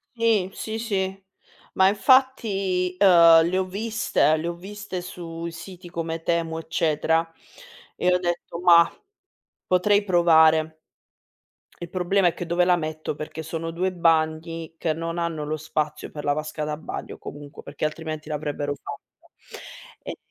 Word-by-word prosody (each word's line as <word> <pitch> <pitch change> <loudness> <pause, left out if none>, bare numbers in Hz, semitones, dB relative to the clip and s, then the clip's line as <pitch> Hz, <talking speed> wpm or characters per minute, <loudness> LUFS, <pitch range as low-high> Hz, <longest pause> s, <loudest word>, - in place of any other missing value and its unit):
Sì, 225 -5 +2
sì, 220 0 -5
sì. 195 -4 -2 0.5
Ma 190 0 +4
infatti, 200 -6 +2
uhm, 170 -4 +7
le 185 - -1
ho 190 - +1
viste, 205 -4 +1
le 160 +2 -4
ho - - -2
viste 195 +1 -7
sui 170 -1 -7
siti 175 +2 -10
come 165 -1 -4
Temu, 165 -1 -1
eccetera 160 0 0 0.6
e 180 - +2
ho 180 - +3
detto: 175 -1 -3
"Mah, 170 -1 +6 0.8
potrei 200 +3 +3
provare". 160 -4 +4 1.0
Il 170 - -6
problema 185 +1 +2
è 170 - -2
che 175 - -6
dove 175 +1 +2
la 180 0 +4
metto? 155 -2 -4
Perché 155 +1 -6
sono 165 +1 -5
2 180 +3 -1
bagni 165 -1 0
che 160 - 0
non 165 +2 -4
hanno 165 -3 -2
lo 155 +1 -2
spazio 155 0 -3
per 150 - -6
la 145 - +1
vasca 155 +1 -4
da 150 0 -2
bagno 160 - -7
comunque, 145 0 -10
perché - - -5
altrimenti 155 0 -4
l'avrebbero 145 -1 -3
fatta. - - -12 0.7
Ehm, - - -6
170 Hz, 150 wpm, -24 LUFS, 160-185 Hz, 1.0 s, uhm